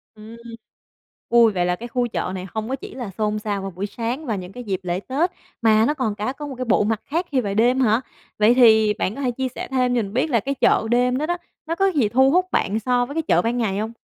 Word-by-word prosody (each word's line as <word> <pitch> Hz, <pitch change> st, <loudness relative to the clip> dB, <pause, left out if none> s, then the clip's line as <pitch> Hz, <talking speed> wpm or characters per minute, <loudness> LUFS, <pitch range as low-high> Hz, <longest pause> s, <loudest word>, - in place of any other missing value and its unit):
Ừm. 220 Hz, +2 st, -12 dB, 0.9 s
Ui, 235 Hz, -2 st, +5 dB
vậy 180 Hz, -3 st, 0 dB
là 180 Hz, 0 st, +1 dB
cái 235 Hz, +6 st, -8 dB
khu 245 Hz, 0 st, -1 dB
chợ 185 Hz, -, -3 dB
này 185 Hz, 0 st, -6 dB
hông 220 Hz, +1 st, -3 dB
có 265 Hz, -, -1 dB
chỉ 260 Hz, -, -10 dB
là 245 Hz, -5 st, -5 dB
xôn 215 Hz, 0 st, 0 dB
xao 205 Hz, -2 st, -3 dB
vào 195 Hz, 0 st, -5 dB
buổi 185 Hz, +4 st, -4 dB
sáng 235 Hz, +8 st, -4 dB
và 225 Hz, -6 st, -1 dB
những 185 Hz, -1 st, -7 dB
cái 245 Hz, +4 st, -8 dB
dịp 195 Hz, -4 st, -2 dB
lễ 180 Hz, 0 st, -2 dB
Tết, 295 Hz, -, -1 dB, 0.3 s
mà 220 Hz, -1 st, +4 dB
nó 295 Hz, -, +1 dB
còn 255 Hz, -8 st, -2 dB
cả 215 Hz, +5 st, -3 dB
có 295 Hz, +1 st, -7 dB
một 275 Hz, -, -7 dB
cái 255 Hz, 0 st, -4 dB
bộ 220 Hz, -, +3 dB
mặt 220 Hz, 0 st, -1 dB
khác 335 Hz, +5 st, -1 dB
khi 260 Hz, -, +2 dB
về 200 Hz, -3 st, -3 dB
đêm 245 Hz, +5 st, +3 dB
hả? 230 Hz, -2 st, +3 dB, 0.4 s
Vậy 215 Hz, +3 st, +5 dB
thì 220 Hz, -4 st, +5 dB
bạn 205 Hz, 0 st, -2 dB
có 280 Hz, -, -6 dB
thể 255 Hz, -3 st, 0 dB
chia 260 Hz, +2 st, -2 dB
sẻ -, -, -5 dB
thêm 250 Hz, -2 st, +1 dB
cho 235 Hz, -, +2 dB
mình 200 Hz, -1 st, -6 dB
biết 255 Hz, +6 st, +1 dB
là 235 Hz, -5 st, +3 dB
cái 275 Hz, +6 st, -3 dB
chợ 225 Hz, -, +2 dB
đêm 250 Hz, +1 st, +2 dB
đó 300 Hz, -, -1 dB
đó, 350 Hz, +2 st, -1 dB, 0.3 s
nó 330 Hz, +1 st, -2 dB
có 390 Hz, +2 st, +2 dB
gì 285 Hz, -, +1 dB
thu 265 Hz, +4 st, +4 dB
hút 365 Hz, +2 st, +3 dB
bạn 210 Hz, +3 st, 0 dB
so 245 Hz, +2 st, +1 dB
với 280 Hz, -, -8 dB
cái 325 Hz, -, +1 dB
chợ -, -, +2 dB
ban 235 Hz, +2 st, -1 dB
ngày 205 Hz, -5 st, -1 dB
hông? 220 Hz, +1 st, -3 dB
235 Hz, 285 wpm, -22 LUFS, 210-260 Hz, 0.9 s, Ui